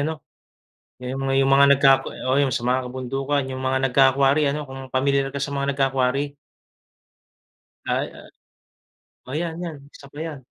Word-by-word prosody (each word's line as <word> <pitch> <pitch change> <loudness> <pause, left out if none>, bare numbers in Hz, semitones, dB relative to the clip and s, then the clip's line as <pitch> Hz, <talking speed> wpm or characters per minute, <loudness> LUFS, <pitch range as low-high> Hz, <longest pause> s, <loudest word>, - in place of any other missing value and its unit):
ano? 155 +1 -3 0.7
Yung 130 +2 -5
mga 135 0 -1
yung 135 0 +3
mga 140 0 +6
nagkaka 135 -1 +4 0.2
oh 130 - +2
yung 135 - +1
sa 120 -1 -2
mga 125 0 0
kabundukan, 135 +2 -2
yung 130 0 -6
mga 130 0 +1
nagka-quarry 135 +3 +4
ano? 150 0 -4
Kung 135 -1 -9
pamilyar 135 +1 +1
ka 140 - -5
sa 140 +1 -3
mga 140 0 -1
nagka-quarry. 135 +1 0 1.5
Ay - - 0
oh - - -14 1.0
oh - - -6
'yan, 165 -1 -3
'yan 165 -4 -5 0.2
isa 140 - -14
pa 145 - -14
'yan. 160 -3 -5
135 Hz, 165 wpm, -23 LUFS, 130-140 Hz, 1.5 s, mga